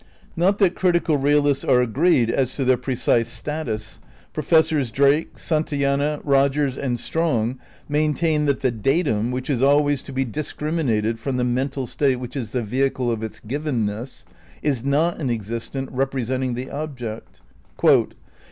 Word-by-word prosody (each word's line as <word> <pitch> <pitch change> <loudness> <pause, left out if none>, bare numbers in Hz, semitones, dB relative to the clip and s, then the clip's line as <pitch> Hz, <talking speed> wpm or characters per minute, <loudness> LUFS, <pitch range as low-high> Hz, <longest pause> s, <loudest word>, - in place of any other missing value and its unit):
Not 190 +4 +2
that 190 -4 +3
critical 170 -4 +2
realists 145 0 +2
are 130 -2 +4
agreed 125 0 +2
as 130 0 0
to 135 - -1
their 130 0 +5
pre 130 +1 -3
cise 115 -1 +2
status. 120 -5 -5 0.3
Professors 155 -3 +2
Drake, 140 +6 +2
Santayana, 145 -2 0
Eogers 140 -1 +2
and 125 -3 -2
Strong 130 -7 -1 0.3
maintain 150 +1 +1
that 140 -2 0
the 130 - +2
datum, 120 - 0
which 125 +1 -3
is 130 -4 0
always 145 0 +3
to - - -10
be 135 0 -1
discriminated 130 -5 -1
from 130 +2 -2
"the 125 - +1
mental 130 +2 -1
state 135 +2 +1
which 125 +1 -7
is 120 -6 -4
the 125 0 -1
vehicle 130 +2 0
of 115 -2 -2
its 110 -1 -6
givenness, 120 -3 -3 0.2
" - - -25
is 135 -6 0
not 150 +5 +1
an 135 - -1
existent 115 +4 -3
"represent 130 -1 -1
ing 125 -2 -2
the 125 +2 -6
object," 130 -7 -6 0.4
"it - - +5
is - - +6
135 Hz, 160 wpm, -22 LUFS, 120-150 Hz, 0.4 s, is